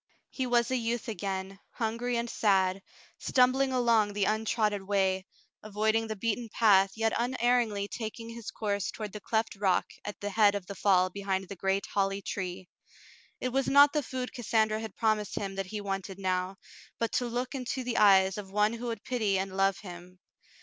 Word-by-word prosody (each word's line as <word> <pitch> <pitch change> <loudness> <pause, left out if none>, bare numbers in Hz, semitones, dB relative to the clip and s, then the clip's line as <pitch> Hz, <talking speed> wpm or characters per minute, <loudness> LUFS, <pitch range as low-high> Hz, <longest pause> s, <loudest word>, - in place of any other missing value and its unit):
He 260 -2 -2
was 240 0 +2
a - - +2
youth 235 0 -2
again, 195 -2 -4
hungry 235 +2 -1
and 235 0 -1
sad, 195 -4 +2 0.4
stumbling 260 +1 +3
along 230 -5 +3
the 200 -1 +1
untrodden 215 -2 0
way, 190 -2 +1 0.3
avoiding 220 +2 0
the 220 - -3
beaten 230 +2 -2
path, 200 -4 +4
yet 225 0 0
un 245 +2 -1
erringly 235 -5 +1
taking 230 +1 -6
his 230 -1 -7
course 205 -2 -2
toward 210 -3 -6
the 210 - -6
cleft 220 +2 -1
rock 195 -2 +2 0.2
at 205 - -6
the 205 0 -4
head 205 -1 +4
of 200 -3 -4
the 200 - -7
fall 185 -2 +3
behind 195 0 -2
the 200 - -6
great 195 +1 0
holly 195 0 -1
tree. 185 -1 -5 0.7
It 255 - -1
was 265 +1 0
not 285 +1 +7
the 300 - +1
food 255 -2 -5
Cassandra 220 -2 +1
had 220 -3 -7
promised 215 -3 0
him 195 -1 -3
that 195 -1 -4
he 210 +2 -5
wanted 195 -1 -4
now, 185 0 -1 0.4
but 230 - -1
to 245 - 0
look 245 +3 -3
into 260 -1 -3
the 245 -2 -2
eyes 195 -1 +5
of 195 -2 -8
one 210 +2 +2
who 235 +1 -5
would 225 -3 -4
pity 215 -6 0
and 190 0 -3
love 195 0 +2
him. 180 -1 -11
210 Hz, 190 wpm, -29 LUFS, 195-235 Hz, 0.7 s, not